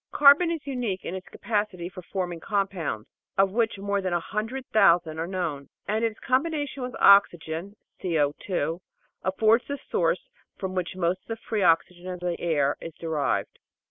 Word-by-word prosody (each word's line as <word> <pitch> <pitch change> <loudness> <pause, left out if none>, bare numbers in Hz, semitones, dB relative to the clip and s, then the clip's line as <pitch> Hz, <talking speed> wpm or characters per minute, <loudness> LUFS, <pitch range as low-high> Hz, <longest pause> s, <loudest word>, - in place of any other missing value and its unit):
Carbon 290 +4 +7
is 330 -3 -3
unique 245 -9 -3
in - - -4
its 190 0 -6
capacity 205 -5 -2
for 185 0 -9
form 180 0 -3
ing 170 - -8
compounds, 190 - -2 0.3
of 195 0 +4
which 225 0 +1
more 200 0 -1
than 185 -2 -1
a 175 - +2
hundred 225 +9 -4
thousand 170 -6 +4
are 165 - -2
known, 165 -7 -3 0.2
and 215 +2 0
its 225 -2 -1
combination 290 +1 0
with 250 0 -4
oxygen 190 -1 +4 0.3
(COa) 165 0 0 0.4
affords 220 +5 +3
the 285 - -3
source - - +1 0.3
from 190 -1 -4
which 185 -1 -2
most 185 0 0
of - - -40
the 225 - -3
free 215 -2 0
oxygen 175 +1 +2
of 180 -1 -5
the 175 -1 -2
air 145 -4 +1
is 165 -1 -8
derived. 160 -4 -1
190 Hz, 175 wpm, -26 LUFS, 170-220 Hz, 0.4 s, Carbon